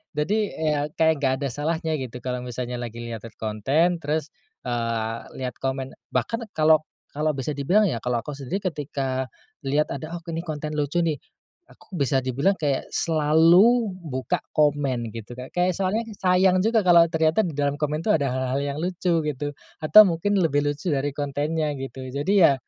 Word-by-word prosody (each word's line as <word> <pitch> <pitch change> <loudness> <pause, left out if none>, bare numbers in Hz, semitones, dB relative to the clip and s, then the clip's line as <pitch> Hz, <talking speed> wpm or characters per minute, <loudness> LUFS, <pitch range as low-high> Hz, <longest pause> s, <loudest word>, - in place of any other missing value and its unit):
Jadi, 205 +7 0
eee, 155 -1 0
ya 145 - +1 0.2
kayak 160 -2 +3
enggak 130 -2 +2
ada - - +1
salahnya 160 +4 -2
gitu 125 -1 -7
kalau 125 -1 -2
misalnya 125 0 -5
lagi 120 -1 -6
lihat-lihat 115 -1 -7
konten, 140 - +1
terus, 155 +1 -2 0.3
eee, 115 -2 -2 0.3
lihat 125 - -5
komen 135 0 -3 0.2
bahkan 230 - -1 0.2
kalau 155 0 +5 0.4
kalau 155 +1 +1
bisa 135 +2 -3
dibilang 180 +10 +3
ya, 120 -8 -2
kalau 125 -1 0
aku 150 - -6
sendiri 140 +8 -4
ketika 135 -3 -3 0.4
lihat 145 +3 +1
ada, 155 +5 -5
"Oh - - -5
ini 165 +1 -3
konten 155 -2 -4
lucu 150 +3 0
nih," 165 -3 +1 0.5
aku 195 - -14
bisa 140 -1 +2
dibilang 130 +9 +1
kayak, 145 -3 0
selalu 170 +9 +4
buka 140 +4 -2 0.2
komen 140 -6 +1
gitu, 115 +2 -7
Kak. 125 +1 -8
Kayak, 180 +1 +2
soalnya 200 +5 0 0.2
sayang 185 0 +4
juga 225 0 +2
kalau 170 -1 +7
ternyata 160 +4 +2
di 170 -8 -3
dalam 145 -1 +1
komen 150 +2 -1
tuh 210 - +3
ada 140 -3 0
hal-hal 130 +1 -1
yang 140 0 -3
lucu, 175 -2 0
gitu. 145 0 -2 0.3
Atau 215 +8 +9
mungkin 190 +4 0
lebih 145 -5 +2
lucu 145 +4 -2
dari 140 +1 0
kontennya, 150 +2 -1
gitu. 135 -1 -7
Jadi 170 +9 +1
ya, 140 - +7
150 Hz, 175 wpm, -24 LUFS, 130-170 Hz, 0.5 s, Atau